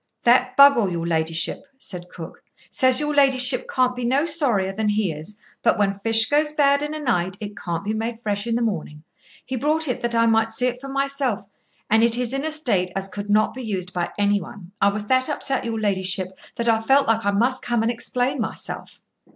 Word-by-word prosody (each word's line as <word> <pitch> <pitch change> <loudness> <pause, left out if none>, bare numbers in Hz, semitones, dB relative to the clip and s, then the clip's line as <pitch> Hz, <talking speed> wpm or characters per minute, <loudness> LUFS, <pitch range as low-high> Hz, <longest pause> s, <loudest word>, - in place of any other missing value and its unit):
"That 250 +1 +3
Buggle, 280 -8 +7
your 170 -1 -3
ladyship," 160 +4 -1 0.2
said 180 -8 -8
cook, 165 -2 -10 0.3
"says 260 -1 +4
your 300 0 -1
ladyship 260 -3 +2
can't 255 -1 +1
be 250 - -5
no 265 +6 +2
sorrier 245 - +1
than 215 +1 -1
he 210 -3 0
is, 160 +7 -9 0.2
but - - +2
when 200 -1 +2
fish 225 +2 +4
goes 300 +1 +2
bad 280 -1 +3
in 295 +1 -3
a - - -5
night 190 - -1
it 210 -2 -7
can't 170 -2 -4
be 210 +2 -2
made 225 +1 -3
fresh 210 -1 -3
in 230 - 0
the 240 - 0
morning. 155 -8 -4 0.4
He 260 - -4
brought 305 +5 0
it 250 - -2
that 235 0 -1
I 230 0 +4
might 225 0 +3
see 245 +3 0
it 250 0 -2
for 275 - -8
myself, 275 -6 -1 0.4
and 220 +1 +3
it 235 0 +4
is 250 0 -2
in 275 +1 -2
a 315 - -2
state 215 - 0
as 195 0 -2
could 205 +1 -7
not 215 +1 +3
be 260 - -7
used 190 -5 -4
by 175 -2 -2
any 205 0 +2
one. 180 +1 -11
I 200 - +5
was 205 +1 -1
that 255 +5 +2
upset, 275 -3 -2
your 225 -1 -2
ladyship, 190 -3 -1 0.3
that 235 - -3
I 225 -1 +3
felt 270 +5 +3
like 225 0 +1
I 205 - +1
must 240 +6 +1
come 235 -2 0
and 230 - +1
explain 250 +2 -1
myself." 220 - -6
225 Hz, 225 wpm, -22 LUFS, 200-260 Hz, 0.4 s, Buggle